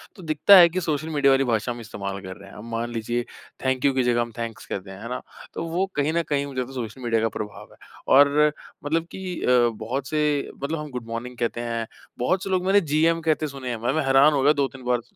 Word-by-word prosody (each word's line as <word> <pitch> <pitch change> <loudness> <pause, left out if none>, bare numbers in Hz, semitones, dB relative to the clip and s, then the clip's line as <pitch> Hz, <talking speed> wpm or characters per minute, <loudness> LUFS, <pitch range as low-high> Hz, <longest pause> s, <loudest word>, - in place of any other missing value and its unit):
तो 190 - -12
दिखता 160 +5 +6
है 175 -2 +9
कि 185 +2 -2
सोशल 155 -2 -2
मीडिया 145 -3 +3
वाली 135 0 +3
भाषा 115 -1 0
हम 120 - -6
इस्तेमाल 100 -3 -5
कर 95 -1 -8
रहे 100 0 -13
हैं। - - -14
अब 105 - -9
मान 115 +1 -2
लीजिए 120 +1 -2 0.4
थैंक 130 0 +1
यू 140 - +4
की 130 -1 +1
जगह 120 -1 +2
हम 120 0 -3
थैंक्स 115 -2 -5
कहते 95 0 -6
हैं। 95 +1 -10
है 115 - -7
ना? 125 - -4 0.3
तो - - -4
वो 175 +4 0
कहीं 145 +2 +1
न 170 0 +1
कहीं 140 -1 +1
मुझे 135 -2 -5
लगता 125 +1 -6
हैं 115 - -2
सोशल 120 +5 -14
मीडिया 115 -2 +1
का 115 - +1
प्रभाव 105 -1 -7
है। - - -19 0.4
और 140 +1 +6
अ, 150 0 +5 0.3
मतलब 160 +3 0
की 185 -2 -5
अ, - - -2 0.3
बहुत 120 +5 -4
से 150 -1 0
मतलब 155 +3 -2
हम 150 0 -6
गुड 125 -2 -6
मॉर्निंग 120 +2 -6
कहते 120 0 -2
हैं। 115 -1 -3 0.3
बहुत 185 +10 +1
से 195 - -4
लोग 185 -1 0
मैंने 200 +2 +4
जीएम 165 +2 +3
कहते 155 -1 +1
सुने 135 -3 -7
हैं। 115 -2 -4
भाई 120 - 0
मैं 155 -2 0
हैरान 135 +3 +5
हो 140 - +1
गया 145 +2 +6
2-3 135 -3 -2
बार 125 -1 +1
135 Hz, 265 wpm, -24 LUFS, 115-155 Hz, 0.4 s, है